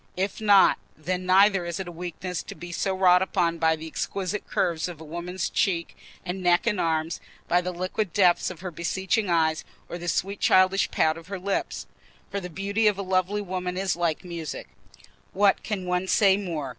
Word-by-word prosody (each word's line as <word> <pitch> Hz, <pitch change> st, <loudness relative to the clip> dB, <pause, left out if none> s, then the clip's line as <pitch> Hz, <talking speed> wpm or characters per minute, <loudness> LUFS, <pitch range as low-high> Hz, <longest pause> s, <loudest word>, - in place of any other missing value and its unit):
If 195 Hz, +3 st, -2 dB
not, 200 Hz, -3 st, +5 dB, 0.2 s
then 180 Hz, +4 st, -3 dB
neither 195 Hz, 0 st, +5 dB
is 170 Hz, 0 st, -4 dB
it 190 Hz, -, -4 dB
a -, -, -6 dB
weakness 175 Hz, +1 st, -5 dB
to -, -, -9 dB
be 175 Hz, 0 st, -9 dB
so 190 Hz, +2 st, -1 dB
wrought 180 Hz, -1 st, +5 dB
upon 170 Hz, -3 st, 0 dB
by 160 Hz, 0 st, +3 dB
the 160 Hz, 0 st, -9 dB
exquisite 195 Hz, +5 st, -3 dB
curves 170 Hz, -3 st, 0 dB
of 175 Hz, -4 st, -8 dB
a -, -, -9 dB
woman's 175 Hz, +3 st, -4 dB
cheek 170 Hz, -4 st, -1 dB, 0.3 s
and 185 Hz, +1 st, -4 dB
neck 175 Hz, -1 st, +3 dB
and 210 Hz, -5 st, +1 dB
arms, 160 Hz, 0 st, -1 dB, 0.3 s
by 175 Hz, +1 st, +3 dB
the 180 Hz, 0 st, -3 dB
liquid 185 Hz, +2 st, -3 dB
depths 180 Hz, -1 st, +3 dB
of 180 Hz, -3 st, -9 dB
her 185 Hz, -1 st, -5 dB
beseeching 190 Hz, +5 st, -1 dB
eyes, 160 Hz, -2 st, +2 dB, 0.2 s
or 175 Hz, -, -6 dB
the 175 Hz, -, -7 dB
sweet 195 Hz, +4 st, -1 dB
childish 185 Hz, +1 st, +4 dB
pout 160 Hz, +1 st, +1 dB
of 165 Hz, -, -16 dB
her 195 Hz, 0 st, -4 dB
lips. 195 Hz, +2 st, -3 dB, 0.5 s
For 200 Hz, -, -2 dB
the 180 Hz, -2 st, -7 dB
beauty 200 Hz, +5 st, 0 dB
of 205 Hz, -2 st, +2 dB
a 200 Hz, -, -3 dB
lovely 190 Hz, +2 st, 0 dB
woman 180 Hz, -1 st, -4 dB
is 190 Hz, 0 st, 0 dB
like 170 Hz, -1 st, -1 dB
music: 170 Hz, -3 st, -6 dB, 0.6 s
what 200 Hz, 0 st, +3 dB
can 200 Hz, -4 st, -4 dB
one 180 Hz, +1 st, -1 dB
say 195 Hz, -1 st, +4 dB
more? 170 Hz, -8 st, -4 dB
180 Hz, 200 wpm, -26 LUFS, 170-195 Hz, 0.6 s, not